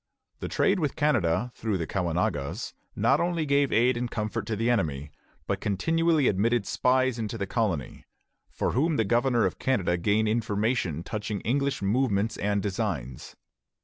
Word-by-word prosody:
The - - -4
trade 195 0 +2
with 150 -5 -1
Canada 120 - +1
through 110 -4 -2
the 85 - -2
Caughnawagas 90 - -2 0.2
not 140 +2 +3
only 170 -2 0
gave 140 -1 +2
aid 120 +3 +3
and 120 0 -2
comfort 105 -2 -3
to 110 - -1
the 115 +3 -1
enemy, 75 - 0 0.3
but 100 0 -2
continually 160 - +2
admitted 110 +3 +1
spies 130 -1 +1
into 110 0 -3
the 100 - -2
colony, 95 - -2 0.4
from - - -2
whom 155 +6 +2
the 110 - +2
governor 120 +1 +2
of 95 - -2
Canada 90 -9 +1
gained 105 +5 +1
information 105 - 0
touching 105 0 -4
English 140 0 0
movements 110 0 +1
and 100 0 0
designs. 95 - -4
110 Hz, 155 wpm, -27 LUFS, 95-130 Hz, 0.4 s, not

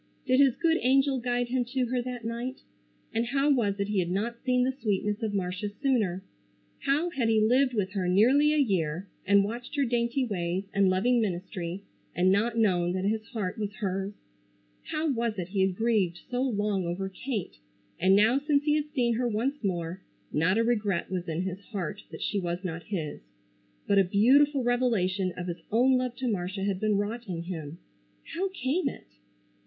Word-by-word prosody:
Did 255 0 +3
his 275 -4 +5
good 330 -1 +2
angel 270 +1 +3
guide 245 0 -1
him 255 0 +1
to 255 -1 +2
her 245 +1 -1
that 245 -2 -6
night? 240 +3 -4 0.5
And 225 - +1
how 275 +3 +2
was 210 -7 +1
it 200 - 0
he 210 -2 +1
had 175 -1 0
not 225 +6 -2
seen 250 -1 +2
the 260 - +1
sweetness 210 -1 0
of 220 -2 -1
Marcia 185 +2 -2
sooner? 205 -6 0 0.6
How 305 +6 +1
had 245 -8 0
he 220 -1 +4
lived 250 +4 +3
with 195 -3 0
her 190 -2 -1
nearly 255 +11 +5
a 305 - +2
year, 185 - 0 0.2
and 200 0 +5
watched 235 +7 -5
her 280 -2 +2
dainty 240 +2 0
ways, 180 -3 -2
and 200 -2 +4
loving 235 +6 +2
ministry 180 -1 -3 0.3
and 185 +1 +3
not 225 +4 +1
known 180 -5 +2
that 185 +1 -2
his 215 +1 0
heart 210 -3 -4
was 205 -1 -3
hers? 195 0 -3 0.7
How 310 +1 -2
was 230 -3 -1
it 180 -1 -4
he 195 0 0
had 190 -1 +2
grieved 205 -6 +1
so 250 0 0
long 210 -6 0
over 185 +3 -2
Kate, 205 - -5 0.4
and 190 +2 +5
now 220 +6 +4
since 290 0 +1
he 300 0 +2
had 300 0 -3
seen 240 -3 +2
her 245 0 +1
once 240 +5 -1
more, 175 -1 -2 0.3
not 165 +7 +2
a 230 - +3
regret 210 -7 0
was 180 -1 -3
in 165 +3 -1
his 190 0 -4
heart 200 -3 -4
that - - -7
she 205 - 0
was 175 0 -3
not 165 -2 -4
his; 165 -8 -4 0.7
but 200 - +4
a - - +6
beautiful 260 +9 +4
revelation 210 -7 +1
of 180 - -4
his 175 -1 -5
own 250 +4 +4
love 250 -1 -1
to 255 0 -3
Marcia 195 -2 -2
had 195 -2 -1
been 215 -1 +1
wrought 220 +4 -3
in 170 -3 -4
him? 165 -3 -6 0.6
How 380 +4 -1
came 295 -2 -1
it? - - -11
215 Hz, 195 wpm, -28 LUFS, 185-250 Hz, 0.7 s, a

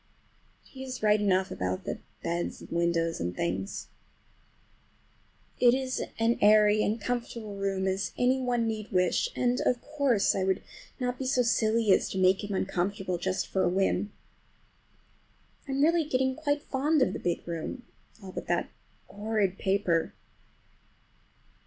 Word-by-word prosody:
But - - -22
he 265 -1 -8
is 255 -3 -6
right 210 0 +4
enough 190 -2 +2
about 90 0 -2
the - - -4 0.2
beds 170 +1 -2
and - - -13
windows 170 -1 +1
and 90 +1 -3
things. 95 +3 -3 1.7
It 245 0 +6
is 260 -1 -2 0.2
as 230 +1 +2
airy 210 0 +6
and 215 +2 0
comfortable 235 -2 -4
a - - -8
room 195 -1 -1
as 190 +1 -1
any 255 +1 +2
one 245 -2 0
need 215 -1 -4
wish, 180 -2 +2
and, 250 0 +1
of 245 - +2
course, 280 -8 +2
I 190 - -1
would 190 0 0 0.4
not 250 -1 -2
be 265 - -2
so 255 -1 +3
silly 225 -2 +2
as - - +3
to - - -4
make 185 +2 +3
him 205 -1 -3
uncomfortable 190 -1 -1
just 185 +1 -1
for 190 - -1
a 175 - +3
whim. 195 +2 0 1.6
I'm 275 +1 +1
really 330 0 +3
getting 260 -1 +1
quite 290 -1 -1
fond 285 +2 +2
of 190 - 0
the - - -4
big 175 0 -2
room, 170 +9 -5 0.4
all 190 - -8
but - - -6
that - - 0 0.4
horrid 205 -2 -1
paper. 190 -4 +1
210 Hz, 160 wpm, -29 LUFS, 185-250 Hz, 1.7 s, It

